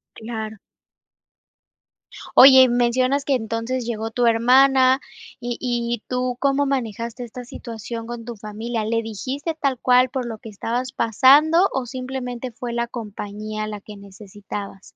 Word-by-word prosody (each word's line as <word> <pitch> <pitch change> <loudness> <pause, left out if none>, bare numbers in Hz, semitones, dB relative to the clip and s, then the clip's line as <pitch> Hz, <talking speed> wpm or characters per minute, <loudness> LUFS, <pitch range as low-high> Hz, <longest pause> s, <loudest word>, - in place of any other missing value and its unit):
Claro. 220 -1 -6 1.8
Oye, 260 -1 +9
mencionas 255 +3 +1
que 280 - +1
entonces 230 +2 -3
llegó 225 -1 -3
tu 245 +1 +1
hermana 260 +3 +5 0.4
y 240 0 -3
y 240 -2 -2
tú, 250 -1 -2
¿cómo 280 0 +2
manejaste 235 -2 -3
esta 250 +2 -9
situación 230 -1 -7
con 240 -1 -6
tu 235 -1 -7
familia? 220 +2 -4
¿Le 230 +1 0
dijiste 260 - -4
tal 275 -4 0
cual 250 0 +4
por 255 -1 -3
lo 230 -2 -5
que 220 - -11
estabas 240 +5 -3
pasando, 295 - +5
o 265 -2 -2
simplemente 255 0 -5
fue 240 +1 -6
la 235 0 -1
compañía 215 -1 -6
la 210 -1 -6
que 210 0 -11
necesitabas? 200 0 -9
240 Hz, 140 wpm, -22 LUFS, 220-255 Hz, 1.8 s, Oye